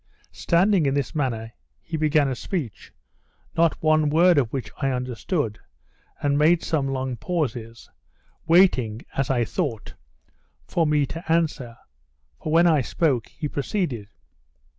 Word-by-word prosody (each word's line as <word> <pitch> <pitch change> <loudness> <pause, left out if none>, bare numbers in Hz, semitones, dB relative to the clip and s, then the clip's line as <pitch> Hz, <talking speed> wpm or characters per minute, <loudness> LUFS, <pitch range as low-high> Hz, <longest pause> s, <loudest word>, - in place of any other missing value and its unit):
Standing 180 -2 +2
in 135 - +1
this 140 -4 -2
manner, 115 -7 -2 0.3
he 165 - -6
began 155 -2 +2
a 135 - -1
speech, 130 - -5 0.6
not 165 -1 +1
one 155 -1 +3
word 170 +1 +5
of 120 -5 -1
which 120 -6 -4
I 135 - 0
understood, 125 - -2 0.6
and 145 0 +2
made 165 +3 +4
some 145 -4 0
long 130 -2 -3
pauses, 120 -7 -4 0.6
waiting, 130 - +3
as 135 -2 -1
I 120 -3 +1
thought, 115 -1 -3 0.7
for 165 -2 +1
me 150 -1 +2
to 165 +4 -6
answer; 150 -8 0 0.6
for, 155 - -3
when 165 +2 +5
I 160 -5 +4
spoke, 130 -3 0
he 155 - -5
proceeded. 140 - -3
145 Hz, 140 wpm, -24 LUFS, 125-165 Hz, 0.7 s, word